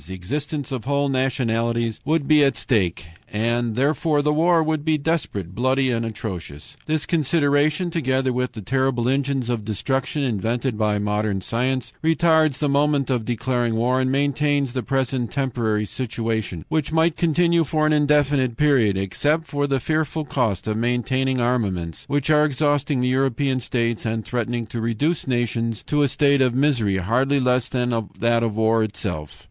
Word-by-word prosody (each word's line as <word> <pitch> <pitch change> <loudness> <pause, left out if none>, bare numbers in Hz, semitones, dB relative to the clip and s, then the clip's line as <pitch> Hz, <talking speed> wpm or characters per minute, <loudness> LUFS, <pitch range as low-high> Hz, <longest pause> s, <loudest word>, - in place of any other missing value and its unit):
The 95 - -6
existence 140 - -4
of 125 -4 -4
whole 140 +1 +1
nationalities 115 -3 0
would 155 -1 0
be 150 -1 +5
at 135 - +2
stake, 90 -8 0 0.3
and 115 +1 -1
therefore 145 +3 +1
the 150 0 +2
war 165 +1 +3
would 155 -1 -1
be 155 0 +2
desperate, 140 - -2
bloody, 130 +3 +1
atrocious. 110 - -5
"This 155 -1 0
consideration, 155 +1 +1
together 130 -5 0
with 125 0 -2
the 110 -3 -8
terrible 130 +1 0
engines 135 -1 0
of 120 -3 -2
destruction 135 +7 -2
invented 120 +1 -1
by 105 -1 +1
modern 105 -1 -1
science, 125 +6 -2
retards 160 -3 +3
the 150 - 0
moment 140 -1 +1
of 120 -4 -1
declaring 120 0 -1
war, 125 +3 +1
and 130 0 0
maintains 140 -1 +1
the 130 - -1
present 130 -1 -1
temporary 115 -6 -1
situation, 110 -6 -3
which 155 -2 -1
might 160 0 +2
continue 170 0 +2
for 155 +1 0
an 155 - +3
indefinite 145 -4 +2
period, 130 -10 +3
except 145 - 0
for 145 -2 -1
the 135 -1 0
fearful 155 +2 -1
cost 120 -8 -1
of 110 0 -1
maintaining 130 +2 0
armaments 100 -10 -1
which 145 +1 0
are 150 0 +5
exhausting 145 -2 +1
the 125 - +1
European 130 +1 +1
states 115 -2 -2
and 110 -1 -2
threatening 120 -1 -2
to 115 +1 -5
reduce 125 +10 -1
nations 115 -2 -1
to 150 0 +1
a 145 - +4
state 140 0 +2
of 125 -2 +2
misery 125 -8 +2
hardly 125 +9 +1
less 125 -1 +1
than 125 -1 -1 0.3
that 115 0 +2
of 115 -3 -1
war 110 +1 +2
itself. 100 -8 -4
130 Hz, 165 wpm, -22 LUFS, 115-145 Hz, 0.3 s, be